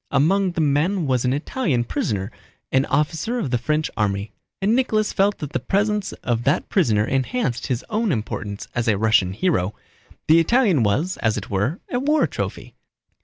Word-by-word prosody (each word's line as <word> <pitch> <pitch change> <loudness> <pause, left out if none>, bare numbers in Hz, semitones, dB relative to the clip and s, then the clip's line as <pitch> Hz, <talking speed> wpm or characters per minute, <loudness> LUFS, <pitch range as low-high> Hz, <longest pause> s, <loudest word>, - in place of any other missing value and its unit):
Among 185 +6 +2
the 170 - -1
men 155 +5 +1
was 130 -2 +1
an 125 - +2
Italian 145 - -1
prisoner, 100 -3 -2 0.4
an 130 +1 +3
officer 160 - 0
of 195 - -2
the 125 - +1
French 150 +5 0
army; 100 -1 -1 0.3
and 205 +4 +2
Nicholas 215 -5 +1
felt 200 +1 +2
that 150 -1 -7
the - - 0
presence 205 - 0
of 120 -1 0
that 140 - +1
prisoner 110 - +2
enhanced 135 - -1
his 125 -2 -2
own 220 -2 0
importance 105 -4 -4
as 120 -1 -1
a 105 -3 +3
Russian 110 -3 +3
hero. 105 - 0 0.5
The 160 +2 +6
Italian 195 - +3
was, 135 - 0
as 110 -2 0
it 105 - -6
were, 105 - -1
a 245 - 0
war 300 +4 +2
trophy. - - -5
145 Hz, 175 wpm, -22 LUFS, -, 0.5 s, The